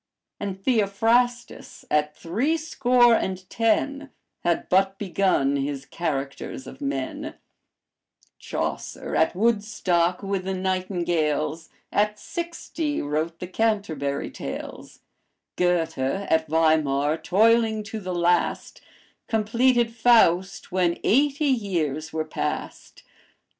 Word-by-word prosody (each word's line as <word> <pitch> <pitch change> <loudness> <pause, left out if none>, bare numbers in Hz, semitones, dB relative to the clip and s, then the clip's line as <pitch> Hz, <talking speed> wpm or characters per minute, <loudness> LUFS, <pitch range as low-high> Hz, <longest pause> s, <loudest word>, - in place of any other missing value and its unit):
And 195 -2 -4
Theophrastus, 235 +3 0
at 150 0 +1
three 235 - 0
score 250 -6 +3
and 185 -4 -1
ten, 275 +5 0 0.3
Had 170 -1 0
but 195 +1 +2
begun 185 -8 +1
his 140 0 -3
Characters 140 -5 -4
of 135 - -11
Men; 135 -2 -3 1.0
Chaucer, - - -4
at 160 - +2
Woodstock 205 -5 +1
with 195 -1 -2
the 190 0 -2
nightingales, 170 -4 -1 0.2
At 210 +1 +1
sixty 335 -2 -4
wrote 155 +3 -2
the 180 - -6
Canterbury 180 -9 -1
Tales; - - -8 0.5
Goethe 175 -5 +1
at 160 +3 0
Weimar, 155 -2 +2
toiling 220 +3 +3
to 220 +1 -6
the 185 -3 -4
last, 175 0 0 0.5
Completed 235 +2 +2
Faust 195 -7 +3
when 180 -2 +1
eighty 285 +5 +2
years 175 - -1
were 155 0 -2
past. 150 -1 -5
185 Hz, 100 wpm, -24 LUFS, 160-225 Hz, 1.0 s, score